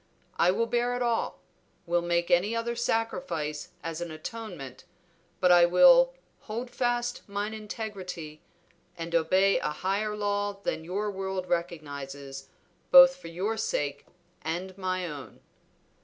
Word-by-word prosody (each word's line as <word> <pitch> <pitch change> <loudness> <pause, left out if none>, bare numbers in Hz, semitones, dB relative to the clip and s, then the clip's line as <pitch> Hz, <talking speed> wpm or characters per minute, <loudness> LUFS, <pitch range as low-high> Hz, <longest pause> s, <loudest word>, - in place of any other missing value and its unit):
I 175 - +5
will 230 +5 +2
bear 240 +1 0
it 245 - -1
all, 235 -1 -1 0.4
will 175 0 +1
make 170 0 0
any 190 +6 +3
other 235 +1 -2
sacrifice 225 - -2
as 165 0 -4
an 170 - -4
atonement, 155 - -7 0.6
but 180 -1 +4
I 175 -1 +8
will - - +7 0.2
'hold 235 +3 -6
fast 240 -1 -1
mine 205 +2 -2
integrity' 195 -8 -6 0.6
and 165 0 -6
obey 185 +4 +3
a - - -1
higher 195 +7 -1
law 205 0 -1
than 160 - -2
your 200 +5 -2
world 190 -1 -3
recognizes, 140 -5 -4 0.4
both 265 0 +9
for 270 - -11
your 190 +7 -2
sake 145 -9 -2 0.3
and 180 +4 -4
my 185 -1 -2
own." 145 -5 -8
190 Hz, 135 wpm, -28 LUFS, 165-225 Hz, 0.6 s, both